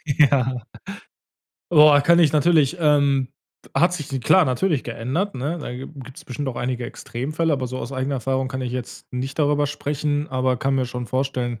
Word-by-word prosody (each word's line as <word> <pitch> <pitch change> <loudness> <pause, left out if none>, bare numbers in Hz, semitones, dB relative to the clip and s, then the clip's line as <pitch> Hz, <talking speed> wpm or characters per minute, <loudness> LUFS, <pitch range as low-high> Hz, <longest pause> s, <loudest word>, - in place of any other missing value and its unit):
Ja. 130 -4 +2 1.1
Boah, 150 -3 +7
kann 170 +4 +4
ich 165 -4 +4
natürlich, 155 0 +3
ähm, 140 -4 +3 0.5
hat 175 +2 +3
sich 150 -6 -5
d 135 - -3
klar, 180 +10 +5
natürlich 140 +3 0
geändert, 130 - -3
ne? 145 +7 -3
Da 150 - -6
gi 130 +2 -7
gibt's 130 -2 -11
bestimmt 135 +2 -4
auch 125 - -5
einige 125 0 -2
Extremfälle, 155 +8 -3
aber 135 -3 -1
so 130 +1 -5
aus 125 - -6
eigener 135 +1 -2
Erfahrung 130 +1 -1
kann 130 0 -4
ich 125 - -4
jetzt 125 0 -7
nicht 130 +3 -4
darüber 145 -1 +2
sprechen, 145 +1 -2
aber 130 -1 0
kann 135 +3 0
mir 130 -1 0
schon 125 0 -5
vorstellen 125 -2 -2
135 Hz, 185 wpm, -22 LUFS, 130-150 Hz, 1.1 s, Boah